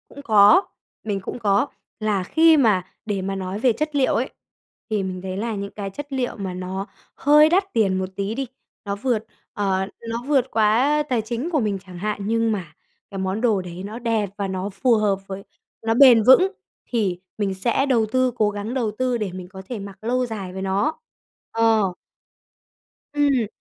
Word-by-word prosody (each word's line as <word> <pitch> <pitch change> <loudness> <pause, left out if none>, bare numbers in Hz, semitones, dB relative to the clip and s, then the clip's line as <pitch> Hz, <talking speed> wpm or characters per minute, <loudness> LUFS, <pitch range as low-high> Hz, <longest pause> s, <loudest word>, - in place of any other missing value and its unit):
Cũng 285 - -11
có, 220 - +6 0.4
mình 205 -2 -2
cũng 195 - -6
có, 205 +3 +2 0.3
là 210 -3 0
khi 320 - +5
mà 215 -9 +3 0.2
để 205 -3 -2
mà 195 +1 -3
nói 190 +1 -4
về 245 0 +3
chất 305 +5 -3
liệu 270 -2 +3
ấy, 250 +3 0 0.6
thì 210 -3 0
mình 185 -1 -4
thấy 190 0 -5
là 225 +1 -2
những 200 0 -5
cái 200 -2 -5
chất 285 +7 -8
liệu 255 -2 -1
mà 190 -3 -4
nó 185 +2 -4 0.3
hơi 300 +2 +6
đắt 380 +3 +1
tiền 195 -4 +2
một 185 0 -2
tí 200 +2 -2
đi, 270 +1 -3 0.4
nó 200 0 -2
vượt, 225 0 -1 0.3
ờ, 190 -2 0 0.2
nó 230 +1 -3
vượt 270 -3 +2
quá, 215 0 +3
a, 295 +4 +3
tài 250 -6 0
chính 235 +8 -3
của 315 -4 +1
mình 210 -5 0
chẳng 180 -2 -10
hạn, 210 +3 -2
nhưng 230 0 +1
mà 180 -7 -4 0.4
cái 195 - -6
món 190 +3 -2
đồ 220 -6 +2
đấy 180 0 -8
nó 215 +3 -6
đẹp 225 -4 0
và 200 -1 -2
nó 190 +1 -3
phù 230 +5 +2
hợp, 205 -3 +1
với 195 0 -6 0.4
nó 225 0 +2
bền 245 -3 +7
vững 360 - +6 0.3
thì 200 -7 -1 0.2
mình 200 -2 -1
sẽ 235 +8 +1
đầu 240 -5 +2
tư, 255 0 +2
cố 215 -3 +2
gắng 205 +3 -5
đầu 240 -5 0
tư 255 -1 +1
để 210 -4 -3
mình 180 0 -8
có 190 +1 -10
thể 240 -4 -4
mặc 195 -1 -9
lâu 250 +2 +1
dài 200 -6 -6
với 190 - -5
nó. 195 +11 0 0.5
Ờ. 225 -4 +2 1.2
Ừm. 280 -6 +2
215 Hz, 205 wpm, -22 LUFS, 195-250 Hz, 1.2 s, bền